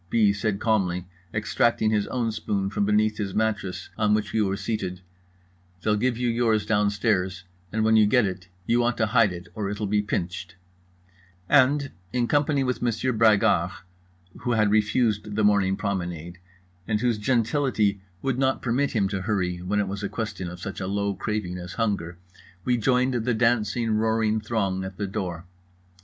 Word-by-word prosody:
B. 105 -2 +4
said 100 -1 -1
calmly, 95 -6 +1 0.3
extracting 110 +1 +1
his 105 -2 +1
own 120 -3 -1
spoon 100 -2 -2
from 100 - 0
beneath 105 +1 +2
his 100 -2 -3
mattress 105 -4 -2
on 105 -1 +3
which 105 -1 -2
we 110 - +2
were 100 -1 0
seated: 95 -5 -3 0.8
"They'll 105 -1 +2
give 120 +2 0
you 125 0 0
yours 115 -3 +1
downstairs 100 -3 +1 0.3
and 110 0 0
when 110 0 +4
you 110 -1 +6
get 125 +1 +4
it 90 -1 -5 0.2
you 120 +4 +2
want 120 0 +1
to 115 - +2
hide 110 -2 +3
it 90 +1 -8
or 105 -2 -3
it'll 105 +1 -3
be 105 +1 +1
pinched"—and 90 +8 -2 0.2
in 120 -1 0
company 145 0 +2
with 125 -1 -2
Monsieur 120 +2 0
Bragard, 105 -6 +4 0.7
who 120 - -1
had 105 -2 +3
refused 105 -1 +1
the 110 - +1
morning 100 -2 +3
promenade, 90 -4 -4 0.5
and 110 -1 +1
whose 120 -3 +1
gentility 115 -3 +1 0.2
would 135 -2 0
not 135 0 +1
permit 130 +4 0
him 105 -5 +2
to 95 -2 -3
hurry 90 -3 -1
when 100 +3 -1
it 100 - 0
was 100 +1 -4
a 100 - -2
question 100 -6 -4
of 90 +1 -9
such 95 +2 -6
a 95 - -3
low 100 +1 -1
craving 95 -3 -3
as 90 +1 -7
hunger, 100 -7 -2 0.5
we 125 - +3
joined 125 +2 +2
the 120 0 0
dancing 115 0 +1
roaring 110 0 +1
throng 100 -4 -1
at 95 0 -7
the 105 - -2
door. 95 -4 -4
105 Hz, 175 wpm, -25 LUFS, 95-115 Hz, 0.8 s, you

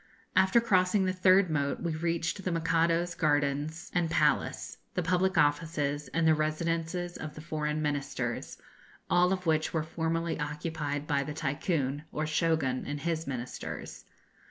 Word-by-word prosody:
After 190 +5 +5
crossing 190 -3 +3
the 185 - +1
third 185 -1 +4
moat 140 -2 0
we 165 -2 -1
reached 165 +3 -1
the 180 - -1
Mikado's 165 +1 +1
gardens 150 +1 0
and 175 -2 +1
palace, - - +1 0.2
the 180 - 0
public 180 +1 +1
offices, 145 -1 +1
and 165 -1 +1
the 160 - +6
residences 165 +3 -1
of 155 -1 -7
the - - -8
foreign 155 -1 -2
Ministers, 145 -2 -2 0.5
all 180 +1 +4
of 185 -1 -1
which 160 0 +1
were 160 - +1
formerly 165 +1 -2
occupied 150 -1 -3
by 145 -2 +1
the 150 +1 -5
Tycoon, 145 -1 -1
or 155 - -2
Shogun, 155 -4 +1
and 145 0 -4
his 165 -2 -2
ministers. 125 -2 -6
160 Hz, 150 wpm, -30 LUFS, 150-170 Hz, 0.5 s, the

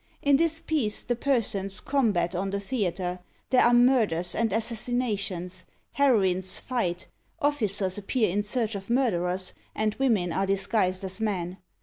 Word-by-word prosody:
In 280 -1 +5
this 325 +1 +1
piece 270 -12 0
the 240 - -1
persons 210 -7 0
combat 220 -11 +1
on 190 +2 -2
the 200 +1 -2
theatre; 190 -5 -2 0.3
there 255 - +5
are 240 - +5
murders 230 -9 +3
and 225 -2 0
assassinations; 215 -5 -2 0.2
heroines 190 -9 +2
fight; 185 -9 -2 0.3
officers 210 - 0
appear 220 +3 0
in 205 +3 +1
search 225 +1 -1
of 195 0 -6
murderers, 185 -7 0 0.2
and 215 -1 0
women 210 -10 +1
are 195 0 0
disguised 195 -1 0
as 190 +2 -4
men. 185 -4 -2
205 Hz, 140 wpm, -27 LUFS, 185-245 Hz, 0.3 s, In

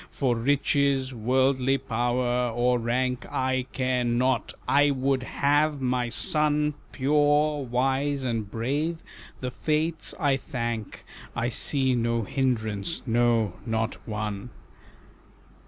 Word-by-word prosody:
For 130 -4 0
riches, 135 +1 +1
worldly 130 +3 +2
power, 125 0 0
or 120 +1 +1
rank 125 +2 -1
I 130 -1 0
care 130 -1 0
not, 120 +2 +1 0.2
I 145 +1 +4
would 135 -1 +1
have 145 +3 +1
my 125 -2 0
son 150 +6 +2 0.2
Pure, 145 +1 +2
wise, 135 +3 0
and 115 -5 -2
brave, 145 +10 -2 0.4
the 125 -1 -3
Fates 155 +4 -1
I 145 -5 +2
thank 120 -5 -5 0.3
I 120 0 0
see 130 +1 0
no 115 -1 0
hindrance, 110 - -1
no, 115 -4 +2
not 115 0 -1
one." 105 +1 -4
130 Hz, 110 wpm, -26 LUFS, 120-140 Hz, 0.4 s, I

